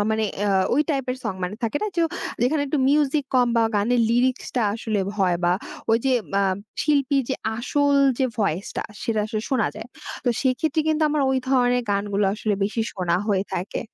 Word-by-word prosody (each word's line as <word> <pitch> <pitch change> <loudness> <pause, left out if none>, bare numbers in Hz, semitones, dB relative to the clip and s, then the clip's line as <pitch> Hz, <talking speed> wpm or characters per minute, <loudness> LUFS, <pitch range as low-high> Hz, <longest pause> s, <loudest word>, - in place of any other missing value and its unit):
আ - - +3
মানে 220 0 +1 0.2
অ্যা 205 -1 +1 0.2
ওই 295 - +4
টাইপের 265 -3 -1
সং 215 -4 -2
মানে 180 +3 -4
থাকে 230 +4 -1
না - - +1
যে 335 - +3 0.4
যেখানে 285 +4 +2
একটু 285 +2 -1
মিউজিক 290 0 +2
কম, 250 -1 +4
বা 230 - +4
গানের 235 +4 +2
লিরিক্সটা 250 0 +1
আসলে 220 -2 -2
ভয় 185 -4 +2
বা 175 - +4 0.4
ওই 225 - +4
যে 265 - +3 0.2
মাম 195 -1 +2 0.3
শিল্পী 280 -2 +2
যে 265 - 0 0.2
আসল 285 +4 +1 0.2
যে 265 - +2
ভয়েসটা 195 -3 -1 0.2
সেটা 220 -2 0
আসলে 215 -1 -3
শোনা 255 -5 +2
যায়। 220 +1 -8 0.4
তো - - +2
সেক্ষেত্রে 310 +5 +1
কিন্তু 315 0 +1
আমার 300 -1 +1
ওই 265 - +2
ধরনের 250 -2 +3
গানগুলো 200 0 0
আসলে 215 -1 -1
বেশি 215 +3 -2
শোনা 175 -3 0
হয়ে 200 -3 +1
থাকে। 185 +4 -3
240 Hz, 190 wpm, -23 LUFS, 205-275 Hz, 0.4 s, ওই